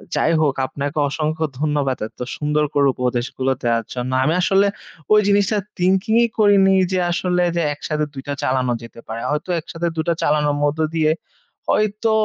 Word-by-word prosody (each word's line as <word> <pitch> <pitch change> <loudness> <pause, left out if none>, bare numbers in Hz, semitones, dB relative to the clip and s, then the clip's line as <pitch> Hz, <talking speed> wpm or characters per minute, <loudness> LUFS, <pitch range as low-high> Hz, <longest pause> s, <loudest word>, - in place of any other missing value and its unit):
যাই - - +2
হোক, 145 -3 +2
আপনাকে 140 +3 -5
অসংখ্য 155 +1 -1
ধন্যবাদ 145 -3 0
এত - - -25 0.2
সুন্দর 150 0 0
করে 140 -1 +3
উপদেশগুলো 125 +1 -1
দেওয়ার 115 -1 +1
জন্য। 125 0 -3
আমি 155 - +2
আসলে 195 +2 +3 0.5
ওই 210 - +7
জিনিসটা 205 +1 +2 0.2
thinking 190 +5 +2
ই - - 0
করিনি 200 -2 +5 0.2
যে 185 - +1
আসলে 180 0 +1
যে 170 - +1
একসাথে 150 +1 -2
২ 135 - -6
টা 145 - -1
চালানো 130 -1 +1
যেতে 115 0 -12
পারে। 115 +1 -5
হয়তো 150 +5 -3
একসাথে 165 +2 -4
২ 160 - -1
টা - - +3
চালানোর 150 -1 +2
মধ্য 145 +2 0 0.2
দিয়ে 155 -1 +3 0.6
হয়তো 215 +1 +1
150 Hz, 170 wpm, -20 LUFS, 135-185 Hz, 0.6 s, ওই